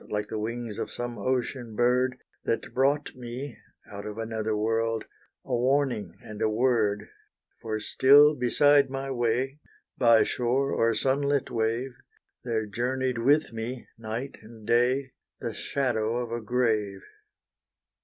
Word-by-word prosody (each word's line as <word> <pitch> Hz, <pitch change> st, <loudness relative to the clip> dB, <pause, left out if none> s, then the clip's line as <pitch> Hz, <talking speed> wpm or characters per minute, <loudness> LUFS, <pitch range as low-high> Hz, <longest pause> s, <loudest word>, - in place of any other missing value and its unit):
Like 105 Hz, 0 st, -2 dB
the 110 Hz, -, -3 dB
wings 115 Hz, 0 st, -4 dB
of -, -, -3 dB
some 120 Hz, -2 st, -5 dB
ocean 125 Hz, 0 st, -2 dB
bird, 125 Hz, +2 st, +2 dB, 0.3 s
That 115 Hz, -, -2 dB
brought 140 Hz, +3 st, +1 dB
me, 125 Hz, +2 st, -7 dB, 0.3 s
out 100 Hz, +1 st, -7 dB
of 105 Hz, 0 st, -7 dB
another 110 Hz, -1 st, -2 dB
world, 115 Hz, +1 st, 0 dB, 0.4 s
A 125 Hz, -, -1 dB
warning, 125 Hz, -7 st, 0 dB
and 110 Hz, 0 st, -9 dB
a 110 Hz, -, +3 dB
word; 110 Hz, -3 st, +1 dB, 0.5 s
For 110 Hz, -1 st, -3 dB
still 145 Hz, +7 st, +6 dB
beside 140 Hz, +2 st, +4 dB
my 135 Hz, 0 st, -4 dB
way, 125 Hz, +3 st, 0 dB, 0.4 s
By 115 Hz, -3 st, +6 dB
shore 130 Hz, +3 st, 0 dB
or 115 Hz, 0 st, +2 dB
sunlit 140 Hz, +1 st, +1 dB
wave, 115 Hz, +3 st, -1 dB, 0.5 s
There 115 Hz, -3 st, -1 dB
journeyed 125 Hz, +3 st, -1 dB
with 145 Hz, +3 st, +3 dB
me 115 Hz, +2 st, -5 dB
night 115 Hz, +4 st, -5 dB
and 110 Hz, 0 st, -14 dB
day, 125 Hz, +3 st, +2 dB, 0.3 s
The -, -, -4 dB
shadow 120 Hz, -4 st, -1 dB
of 120 Hz, -2 st, -3 dB
a 120 Hz, 0 st, -3 dB
grave. 110 Hz, -4 st, 0 dB
120 Hz, 135 wpm, -27 LUFS, 110-130 Hz, 0.5 s, still